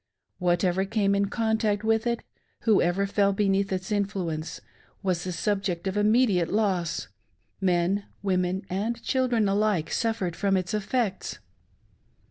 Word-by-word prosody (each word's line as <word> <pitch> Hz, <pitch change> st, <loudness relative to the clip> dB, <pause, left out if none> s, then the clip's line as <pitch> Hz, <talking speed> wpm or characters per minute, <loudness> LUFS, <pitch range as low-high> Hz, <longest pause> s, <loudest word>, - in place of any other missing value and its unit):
Whatever 180 Hz, +1 st, +2 dB
came 200 Hz, 0 st, +1 dB
in 200 Hz, 0 st, +2 dB
contact 220 Hz, -1 st, 0 dB
with 225 Hz, +1 st, +2 dB
it, 235 Hz, 0 st, -1 dB, 0.4 s
whoever 195 Hz, -3 st, +3 dB
fell 200 Hz, 0 st, +2 dB
beneath 195 Hz, -1 st, +1 dB
its 190 Hz, +2 st, -3 dB
influence, 190 Hz, -6 st, -2 dB, 0.4 s
was 180 Hz, -3 st, 0 dB
the 185 Hz, -, -3 dB
subject 185 Hz, 0 st, -1 dB
of 190 Hz, 0 st, -1 dB
immediate 210 Hz, -4 st, +3 dB
loss; 190 Hz, -6 st, 0 dB, 0.3 s
— -, -, -43 dB
men, 180 Hz, +4 st, +1 dB, 0.2 s
women, 185 Hz, -1 st, 0 dB
and 220 Hz, +5 st, -2 dB
children 245 Hz, -5 st, +1 dB
alike 200 Hz, -5 st, +1 dB
suffered 220 Hz, -7 st, -1 dB
from 195 Hz, -2 st, +1 dB
its 185 Hz, +1 st, -3 dB
effects. 210 Hz, 0 st, -1 dB
200 Hz, 130 wpm, -26 LUFS, 185-215 Hz, 0.4 s, whoever